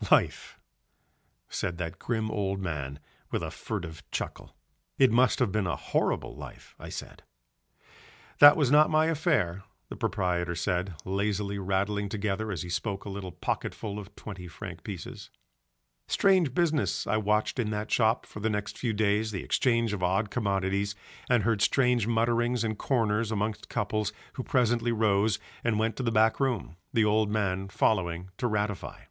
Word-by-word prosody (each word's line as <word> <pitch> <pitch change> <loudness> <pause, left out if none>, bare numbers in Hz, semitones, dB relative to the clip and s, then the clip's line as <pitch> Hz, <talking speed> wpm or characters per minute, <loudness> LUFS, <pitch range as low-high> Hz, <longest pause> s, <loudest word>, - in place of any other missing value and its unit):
"Life," - - +2 0.9
said 90 -2 -3
that 85 -2 -5
grim 110 -2 -1
old 100 -2 -1
man 75 -7 -4 0.3
with - - -2
a - - -3
furtive 80 -1 -5
chuckle. - - -5 0.4
"It 130 -3 +5
must 125 +3 +4
have 125 -6 +1
been 100 -1 0
a - - 0
horrible - - -1
life," - - -11
I - - -8
said. - - -8 1.2
"That 145 0 +10
was 140 -5 +2
not 150 +1 +6
my 155 0 +4
affair," 145 - +1 0.3
the - - -6
proprietor 90 -3 -1
said, 90 +1 -1
lazily 100 +1 -1
rattling 100 +2 0
together 105 +1 -2
as 90 -6 -3
he - - -7
spoke 95 +3 -3
a - - -5
little 95 -2 -5
pocketful 105 +4 -3
of 105 0 -11
twenty 95 -4 -8
franc 85 0 -8
pieces. 95 -6 -7 0.8
Strange 185 -9 +3
business 150 - +1
I 110 - +1
watched 105 +3 +1
in 110 -4 0
that 105 0 -3
shop 110 0 +3
for - - -9
the 110 +2 0
next 105 -1 -3
few 120 -3 0
days, 105 +1 +1
the 100 -3 -4
exchange 115 -4 +2
of 100 - -3
odd 95 +4 +1
commodities, 100 -2 0 0.3
and 120 -4 +4
heard 110 -1 +1
strange 125 -5 +3
mutterings 120 +1 +1
in 110 -1 -1
corners 115 -2 0
amongst 105 0 -2
couples 105 -1 -1 0.2
who - - -4
presently 120 -2 +2
rose 105 -2 +2 0.3
and 115 -2 +1
went 110 +1 0
to - - -2
the 120 -2 0
back 110 0 +3
room, 130 - -1 0.2
the 110 -2 +3
old 105 0 +3
man 95 -2 -1
following 90 -2 0
to 125 - +1
ratify. 105 -3 -2
105 Hz, 165 wpm, -28 LUFS, 95-115 Hz, 1.2 s, That